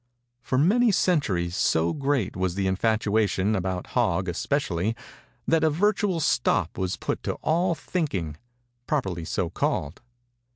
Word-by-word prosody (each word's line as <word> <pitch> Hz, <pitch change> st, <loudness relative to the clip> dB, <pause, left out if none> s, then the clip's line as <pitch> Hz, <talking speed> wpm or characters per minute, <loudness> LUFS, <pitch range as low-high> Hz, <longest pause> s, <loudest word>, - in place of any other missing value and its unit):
For 130 Hz, -, -1 dB
many 220 Hz, -, +4 dB
centuries, 100 Hz, -, +1 dB
so 80 Hz, -2 st, +2 dB
great 140 Hz, -8 st, -1 dB
was 95 Hz, -1 st, -1 dB
the 100 Hz, 0 st, -1 dB
infatuation, 105 Hz, 0 st, +1 dB
about 95 Hz, -1 st, -2 dB
Hog 95 Hz, -7 st, +1 dB
especially, 100 Hz, -, -1 dB, 0.5 s
that 160 Hz, -1 st, +3 dB
a 160 Hz, -, +5 dB
virtual 195 Hz, +2 st, +1 dB
stop 95 Hz, -, +1 dB
was 95 Hz, -1 st, -2 dB
put -, -, -3 dB
to -, -, -2 dB
all 170 Hz, +2 st, +2 dB
thinking, 95 Hz, -, -3 dB, 0.5 s
properly 95 Hz, -, -1 dB
so 90 Hz, 0 st, -2 dB
called. 75 Hz, -2 st, -2 dB
110 Hz, 130 wpm, -25 LUFS, -, 0.5 s, a